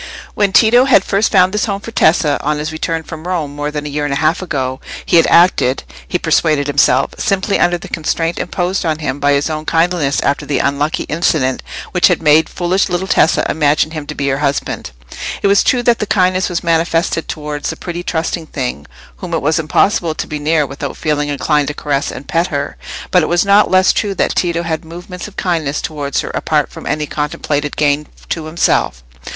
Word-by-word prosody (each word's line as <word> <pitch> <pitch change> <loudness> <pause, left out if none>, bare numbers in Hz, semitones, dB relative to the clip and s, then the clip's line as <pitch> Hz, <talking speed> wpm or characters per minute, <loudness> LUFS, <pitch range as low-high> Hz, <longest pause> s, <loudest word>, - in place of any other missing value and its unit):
When 205 -2 +1
Tito 240 +5 +5
had 255 -8 +5
first 200 +3 +1
found 185 -1 +4
this 210 - +1
home 200 -2 -2
for 230 - -9
Tessa, 155 -7 +2
on 150 +1 -1
his 150 +1 -3
return 160 +1 -3
from 160 +2 -8
Rome, 160 -6 -2
more 145 0 -3
than 150 0 -5
a - - -4
year 145 +1 -2
and 145 -1 -1
a - - 0
half 155 +4 +1
ago, 135 -7 -3 0.2
he - - +3
had 165 - +5
acted, 170 -7 +3 0.2
he - - 0
persuaded 150 -3 +1
himself, 135 -2 +2
simply 195 0 0
under 175 0 +3
the 170 - -10
constraint 165 +1 -2
imposed 180 +1 -2
on 160 -3 0
him 145 -3 -3
by 145 0 +3
his 140 0 +1
own 155 -1 -3
kindliness 165 -3 +1
after 140 - 0
the 145 - -1
unlucky 145 +2 0
incident 150 -5 0 0.3
which 180 - +4
had 180 - +1
made 155 0 +4
foolish 185 +2 0
little 175 +1 -1
Tessa 165 - +3
imagine 150 0 +1
him 155 -3 -6
to - - -6
be 140 - -2
her 135 0 -1
husband. 140 - -2 0.5
It - - 0
was 200 0 +4
true 245 -1 +2
that 240 -1 +3
the 210 - -2
kindness 185 -1 +2
was 175 - -3
manifested 165 0 0
towards 150 -1 -4
a - - -6
pretty 175 0 -5
trusting 165 -1 -3
thing 125 - -4 0.3
whom 175 -2 -4
it 160 - -1
was 155 +3 +2
impossible 165 +1 +1
to - - -3
be 150 - -5
near 150 0 +1
without 140 +1 -6
feeling 150 -2 -1
inclined 145 +1 +1
to 150 - -3
caress 145 -2 -1
and 135 - -9
pet 170 +2 +1
her; 140 -3 -3 0.4
but 180 - +5
it 155 - -1
was 175 +2 +2
not 200 +1 +5
less 185 0 +4
true 200 -2 -1
that - - 0
Tito 170 -1 0
had 160 -2 -3
movements 175 +3 -8
of 210 - -14
kindness 160 -5 -1
towards 145 -3 -3
her - - -6
apart - - 0
from - - -9
any 150 0 -1
contemplated 145 -1 -3
gain 150 0 +1 0.2
to 160 -2 -3
himself. 65 - 0
160 Hz, 215 wpm, -16 LUFS, 145-180 Hz, 0.5 s, Tito